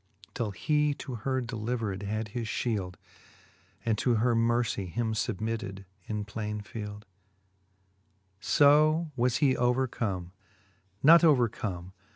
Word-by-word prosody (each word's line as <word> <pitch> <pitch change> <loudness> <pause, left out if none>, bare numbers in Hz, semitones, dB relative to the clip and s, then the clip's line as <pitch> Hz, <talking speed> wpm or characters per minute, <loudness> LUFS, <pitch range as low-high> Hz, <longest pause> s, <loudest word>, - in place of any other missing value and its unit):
Till 115 -4 -2
he 150 +8 +1
to 130 - -7
her 130 +3 -1
delivered 115 -4 -3
had 110 +2 -3
his 115 +1 -4
fhield, 100 -6 -2 0.9
And 110 -2 +1
to 125 -2 +2
her 120 +2 +2
mercie 115 -3 +1
him 110 +4 -2
fubmitted 110 -3 -3 0.2
in 105 -1 -3
plaine 105 0 -4
fields 105 -1 -8 1.4
XVII. - - +3
5o 155 +3 +4
was 125 -1 +1
he 135 -2 +3
overcome, 120 -8 -1 0.7
not 165 +4 +8
overcome. 110 - +1
115 Hz, 120 wpm, -29 LUFS, 105-125 Hz, 1.4 s, not